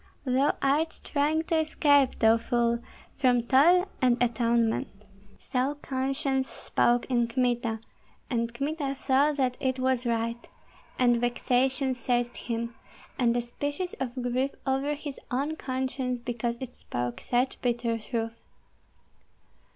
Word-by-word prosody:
Thou 265 +2 +2
art 300 +4 +1
trying 305 +2 +1
to 325 0 +1
escape, 285 -3 +3
thou 225 0 +5
fool, 235 -1 +1 0.4
from 250 -3 +3
toil 330 +10 +5
and 250 -2 +4
atonement." 235 -1 +1 0.5
So 265 +2 -1
conscience 270 -1 -1
spoke 240 0 +1
in 240 -2 +1
Kmita; 240 -2 0 0.5
and 235 -2 -1
Kmita 275 +2 -2
saw 275 +2 +3
that 260 -3 0
it 260 -1 0
was 255 -1 +1
right, 230 0 -2 0.5
and 240 -2 +3
vexation 255 +2 +1
seized 245 -1 -1
him, 235 0 -4 0.5
and 240 -1 +3
a - - +1
species 285 +9 -4
of 250 -2 -3
grief 250 +2 0 0.2
over 270 +2 0
his 290 -1 -7
own 280 +5 -1
conscience 260 -2 -2
because 235 0 -3
it 255 -2 -7
spoke 120 0 -4
such 250 +2 0
bitter 235 -2 0
truth. 225 0 -4
255 Hz, 130 wpm, -28 LUFS, 235-275 Hz, 0.5 s, thou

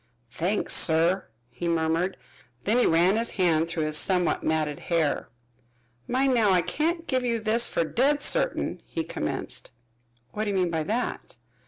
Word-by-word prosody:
"Thanks, 185 +10 -1
sir," 170 +4 +3 0.2
he 175 - -5
murmured. 165 +2 0 0.5
Then 225 +4 +2
he - - +4
ran 175 +5 +3
his 230 +1 +1
hand 165 -3 +2
through 170 -1 -2
his 155 0 +1
somewhat 180 -1 +1
matted 155 -2 -1
hair. 165 -4 -1 0.8
"Mind 260 +1 +2
now, 225 -4 +3
I 180 -2 +3
can't 330 - -1
give 260 -5 0
you 235 -2 0
this 225 +2 +2
fer - - 0
dead 280 - +1
certain," - - 0
he - - -3
commenced. - - -4 0.6
"What 215 +1 -3
do - - -2
you 200 - -1
mean 180 -2 +1
by 160 -1 -1
that?" 225 +10 -3
185 Hz, 165 wpm, -26 LUFS, 165-235 Hz, 0.8 s, he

